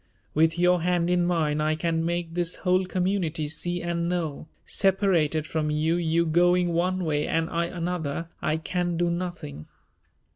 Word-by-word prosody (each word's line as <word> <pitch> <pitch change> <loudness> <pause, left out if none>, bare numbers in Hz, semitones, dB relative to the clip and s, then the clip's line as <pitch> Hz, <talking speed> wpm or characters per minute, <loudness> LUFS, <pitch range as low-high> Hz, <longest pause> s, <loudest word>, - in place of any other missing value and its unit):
With 160 +2 +3
your 180 0 +3
hand 175 0 +1
in 175 -1 +2
mine 155 -4 +1
I 155 +1 +1
can 165 0 -1
make 170 0 -2
this 175 0 -1
whole 185 +1 +3
community 180 -4 -1
see 175 +3 -3
and 170 0 -1
know; 160 -4 -3 0.2
separated 180 -6 +2
from 155 -1 -2
you, 155 +2 +1
you 170 0 +1
going 175 +2 +3
one 180 +2 0
way 150 -1 0
and 165 0 0
I 170 0 0
another, 170 -3 -3
I 155 - 0
can 175 +1 -2
do 175 0 +1
nothing. 170 - -5
170 Hz, 160 wpm, -26 LUFS, 160-180 Hz, 0.2 s, With